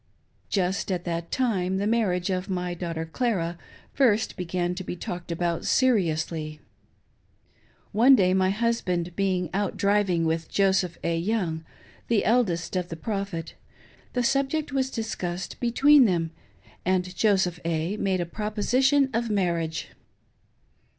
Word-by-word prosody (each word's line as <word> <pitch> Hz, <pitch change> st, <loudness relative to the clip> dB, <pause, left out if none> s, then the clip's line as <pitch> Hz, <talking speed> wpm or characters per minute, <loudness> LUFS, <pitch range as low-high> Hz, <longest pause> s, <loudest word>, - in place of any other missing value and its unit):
Just 190 Hz, 0 st, 0 dB
at 180 Hz, -2 st, -1 dB
that 170 Hz, -1 st, -3 dB
time, 190 Hz, -8 st, 0 dB
the 200 Hz, -, -1 dB
marriage 200 Hz, -5 st, +1 dB
of 185 Hz, +1 st, -2 dB
my 180 Hz, -1 st, -2 dB
daughter 165 Hz, -2 st, -4 dB
Clara 170 Hz, -3 st, -1 dB, 0.3 s
first 225 Hz, -5 st, +2 dB
began 180 Hz, -1 st, -2 dB
to 185 Hz, +1 st, -5 dB
be 175 Hz, -, -5 dB
talked 175 Hz, 0 st, -6 dB
about 170 Hz, 0 st, -1 dB
seriously. 160 Hz, -10 st, +1 dB, 1.3 s
One 245 Hz, +6 st, +6 dB
day 185 Hz, -5 st, +3 dB
my 185 Hz, 0 st, +3 dB
husband 190 Hz, -6 st, -1 dB
being 185 Hz, -4 st, 0 dB
out 200 Hz, 0 st, -1 dB
driving 200 Hz, -4 st, +2 dB
with 160 Hz, 0 st, -1 dB
Joseph 190 Hz, -3 st, +1 dB
A. 170 Hz, -, 0 dB
Young, 175 Hz, -4 st, -1 dB, 0.4 s
the 230 Hz, -3 st, +2 dB
eldest 205 Hz, -8 st, +1 dB
son 185 Hz, -, +1 dB
of 175 Hz, -1 st, -5 dB
the 165 Hz, -, -5 dB
Prophet, 195 Hz, -2 st, -4 dB, 0.6 s
the 245 Hz, -, 0 dB
subject 275 Hz, +4 st, 0 dB
was 265 Hz, -1 st, 0 dB
discussed 190 Hz, -7 st, -4 dB
between 270 Hz, +3 st, +5 dB
them, 170 Hz, -5 st, 0 dB, 0.5 s
and 185 Hz, 0 st, 0 dB
Joseph 190 Hz, -5 st, +2 dB
A. 165 Hz, +3 st, -1 dB
made 190 Hz, -3 st, 0 dB
a -, -, -1 dB
proposition 245 Hz, -, +2 dB
of 230 Hz, +1 st, 0 dB
marriage. 170 Hz, -5 st, -1 dB
185 Hz, 135 wpm, -26 LUFS, 170-220 Hz, 1.3 s, One